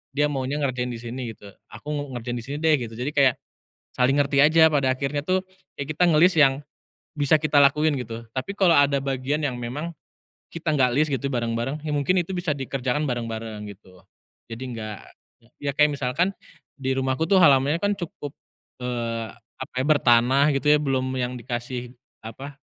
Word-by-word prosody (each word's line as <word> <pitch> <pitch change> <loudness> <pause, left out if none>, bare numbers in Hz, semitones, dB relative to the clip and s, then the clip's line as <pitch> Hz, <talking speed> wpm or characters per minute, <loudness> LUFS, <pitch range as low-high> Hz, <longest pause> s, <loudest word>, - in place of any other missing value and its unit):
dia 145 +1 +3
maunya 135 +1 -2
ngerjain 125 -2 -1
disini 120 0 -6
gitu, 100 -1 -14 0.2
aku 115 +8 -13 0.3
ngerjain 120 +1 -4
disini 135 +5 -6
deh 160 -1 +4
gitu, 115 -2 -6
jadi 125 +5 -3
kayak 140 -4 +4 0.6
saling 130 +3 +2
ngerti 140 -1 +2
aja 160 +2 +6
pada 135 -3 +2
akhirnya 145 +1 -2
tuh 185 +1 0 0.3
ya 140 - -4
kita 155 +5 +1
ngelis 170 +2 +4
yang 135 0 +4 0.6
bisa 145 +2 +4
kita 150 -1 +3
lakuin 145 0 +3
gitu. 115 -1 -6
Tapi 135 +11 -4
kalau 185 -4 +4
ada 140 -1 +4
bagian 135 +3 -2
yang 125 -4 -2
memang 145 +8 -5 0.6
kita 165 -2 -2
gak 130 -3 +3
lis 155 - +4
gitu 140 +1 -1
bareng-bareng, 120 +4 -2
ya 150 - -2
mungkin 145 +6 +1
itu 180 +2 -1
bisa 175 -2 -3
dikerjakan 135 +2 -2
bareng-bareng 115 -3 -4
gitu, 95 -2 -15 0.5
jadi 115 +3 -7
enggak 110 -4 -6 0.6
ya 140 0 -1
kayak 150 0 +5
misalkan 170 +10 0 0.5
di 130 0 -1
rumahku 130 +4 0
tuh 195 - +5
halamannya 145 -2 +5
kan 205 0 +1
cukup, 160 -6 -7 0.5
eee, 115 -2 -3 0.3
apa 130 - -7
ya, 130 - 0
bertanah 135 -1 +4
gitu 140 - -2
ya, - - +5
belum 135 -2 0
yang 125 0 -2
dikasih 120 0 -5 0.3
apa, 135 +5 -9
135 Hz, 170 wpm, -24 LUFS, 120-150 Hz, 0.6 s, aja